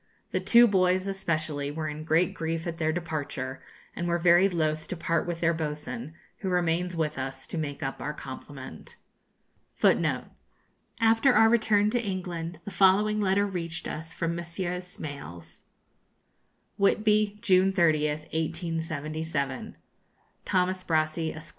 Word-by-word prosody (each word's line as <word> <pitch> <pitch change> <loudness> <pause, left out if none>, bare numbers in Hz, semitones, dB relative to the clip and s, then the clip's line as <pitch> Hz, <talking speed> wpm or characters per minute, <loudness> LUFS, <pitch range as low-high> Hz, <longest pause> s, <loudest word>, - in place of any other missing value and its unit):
The - - 0
two 235 0 +7
boys, 185 -3 +2
especially, 155 -7 -2
were 155 +1 -3
in 150 +1 -5
great 165 +2 +2
grief 165 0 -3
at 165 -1 -4
their 155 -1 +1
departure, 150 -6 -4 0.3
and 175 - -2
were 170 0 +2
very 175 +3 +5
loth 155 -3 -1
to 185 - -5
part 165 +1 0
with 170 -1 -3
their 170 0 +3
boatswain, 150 -3 -5 0.2
who 190 - -3
remains 180 0 0
with 155 -4 -1
us 135 0 -5
to - - -6
make 145 -2 -4
up 135 0 -4
our 150 - -2
complement. 130 - -9 0.8
[Footnote - - +2
3: - - -22 0.8
After 225 +4 +5
our 225 0 +7
return 215 -2 +3
to 240 0 0
England 180 -4 -4
the 205 - -6
following 210 +3 +4
letter 200 +1 +2
reached 170 -4 -4
us 160 +2 -5
from 165 0 -2
Messrs. 175 +1 -3
Smales: 90 - -8 1.2
'Whitby, 210 +1 +3
June 190 -3 +4
30th, 155 -4 +2
1877. 160 -3 -3 0.7
'THOMAS 185 0 +1
BRASSEY, 160 0 0
Esq. 155 - -9
165 Hz, 140 wpm, -28 LUFS, 155-185 Hz, 1.2 s, two